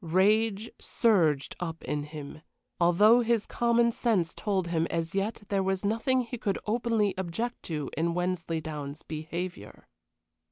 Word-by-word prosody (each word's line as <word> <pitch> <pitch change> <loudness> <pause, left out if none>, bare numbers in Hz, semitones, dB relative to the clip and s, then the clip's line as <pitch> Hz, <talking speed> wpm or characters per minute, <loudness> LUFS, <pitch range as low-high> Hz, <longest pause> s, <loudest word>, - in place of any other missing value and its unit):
Rage 210 +5 +2
surged 165 - +2
up 165 -2 -5
in 145 -1 -2
him, 150 0 -9 0.4
although 205 +7 +6
his 230 -2 +1
common 235 0 +2
sense 210 -9 +1
told 190 -5 -1
him 165 -1 +1
as 165 -1 -2
yet 200 +3 -2
there 195 -1 +1
was 190 +1 -1
nothing 230 +5 +2
he 245 0 -6
could 200 -3 -1
openly 220 -2 +1
object 225 +7 -3
to 150 -4 -3
in 170 +2 0
Wensleydown's 160 -5 -3
behavior. 160 - -6
185 Hz, 135 wpm, -28 LUFS, 165-220 Hz, 0.4 s, although